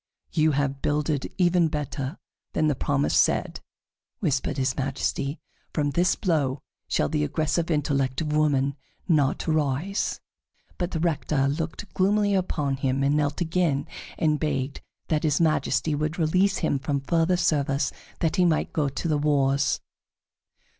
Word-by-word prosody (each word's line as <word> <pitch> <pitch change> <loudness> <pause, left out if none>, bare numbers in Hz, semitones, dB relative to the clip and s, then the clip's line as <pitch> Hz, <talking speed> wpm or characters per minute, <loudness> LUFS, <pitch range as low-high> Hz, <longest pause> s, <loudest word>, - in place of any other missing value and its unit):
"You 155 -1 +3
have 140 -1 -1
builded 150 -1 0
even 175 -2 +4
better 145 -1 -4 0.4
than 155 - +1
the 150 - +3
promise 145 +1 0
said," - - +2 0.6
whispered 145 - 0
his 130 -1 0
Majesty. 135 +2 -2 0.4
"From 145 -2 +1
this 175 +5 +2
blow 145 -7 0 0.2
shall 75 - +1
the 75 - 0
aggressive 155 - 0
intellect 140 -4 0
of 150 -2 -2
woman 140 -3 +2 0.3
not 150 -4 +2
arise." 155 +5 0 0.6
But 175 -1 -1
the 165 - -3
Rector 150 -4 +1
looked 160 +7 -4
gloomily 205 +2 +2
upon 150 -7 0
him 135 0 0
and 140 +1 +3
knelt 145 +2 0
again, 165 -4 +1 0.3
and 155 -2 +2
begged 140 -3 -2 0.3
that 155 -2 +2
his 150 -3 +1
Majesty 155 -2 +1
would 155 +2 -1
release 185 +4 +2
him 150 -5 0
from 140 0 -1
further 165 +4 +2
service 145 -4 +1 0.3
that 160 -2 +1
he 180 - +4
might 165 -3 +1
go 150 -3 +1
to 140 +5 -4
the 150 -2 +1
wars. 140 -2 +2
150 Hz, 145 wpm, -25 LUFS, 140-165 Hz, 0.6 s, even